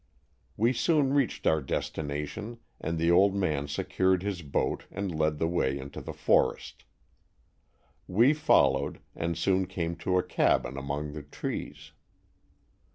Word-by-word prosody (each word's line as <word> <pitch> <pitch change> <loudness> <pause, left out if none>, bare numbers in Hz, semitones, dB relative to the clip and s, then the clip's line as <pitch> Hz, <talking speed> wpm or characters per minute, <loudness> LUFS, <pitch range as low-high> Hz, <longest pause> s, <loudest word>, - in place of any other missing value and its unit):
We 115 +4 +3
soon 145 0 +2
reached 140 -4 0
our 80 -1 +3
destina 75 +2 -3
tion 110 +10 -7 0.2
and 80 +1 -3
the 85 +1 +2
old 95 +3 +5
man 75 -7 0
secured 95 +5 0
his 100 -3 -3
boat 70 -3 -1
and 100 -2 -4
led 75 -1 0
the 80 - 0
way 70 -6 0
into 70 +1 -8
the - - -6
forest. - - 0 1.2
We 115 +10 +4
followed 155 0 +2 0.2
and 85 -1 -2
soon 95 +1 +1
came 85 -3 -3
to 90 +2 0
a 90 - +2
cabin 80 -6 +1
among 70 +2 -4
the 75 - -6
trees. 75 +1 -6
85 Hz, 145 wpm, -28 LUFS, 75-100 Hz, 1.2 s, old